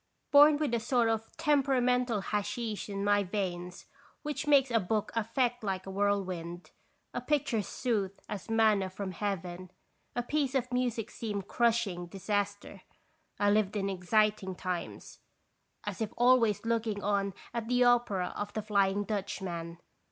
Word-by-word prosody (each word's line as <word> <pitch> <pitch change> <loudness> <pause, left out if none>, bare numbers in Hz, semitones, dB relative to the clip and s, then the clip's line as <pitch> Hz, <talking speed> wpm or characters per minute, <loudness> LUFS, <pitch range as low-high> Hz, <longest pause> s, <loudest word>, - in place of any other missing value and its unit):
Born 290 +1 +8
with 295 -5 -1
a 235 - +2
sort 235 0 +2
of 225 0 -2
temperamental 250 -7 +2
hasheesh 210 +2 -3
in 200 0 -3
my 205 0 +3
veins 180 -2 -4 0.4
which 295 0 -3
makes 275 -3 +5
a 230 - +4
book 210 +2 -1
affect 240 +2 0
like 190 -2 -2
a 195 - -6
whirlwind, 185 -4 -2 0.4
a 245 - -3
picture 250 -5 +1
soothe 200 -3 -2
as 210 +1 -6
manna 215 -4 +3
from 190 0 -5
Heaven, 185 -2 -4 0.5
a 245 - 0
piece 280 0 -1
of 250 -1 0
music 240 -3 -1
seem 205 -3 -4
crushing 205 -5 0
disas 205 +2 -1
ter, 195 -1 -12 0.6
I 205 0 +4
lived 210 -1 +2
in 195 -1 -1
exciting 195 +1 +1
times, 180 -1 -5 0.6
as - - -5
if 215 - -1
always 240 -4 +4
look 230 0 0
ing 205 -2 -3
on 200 -1 0 0.2
at 230 -1 -3
the 250 +1 +3
opera 235 -7 +2
of 205 0 -4
the 215 - -3
Flying 200 -1 +2
Dutchman. 185 -5 -4
210 Hz, 150 wpm, -31 LUFS, 195-240 Hz, 0.6 s, Born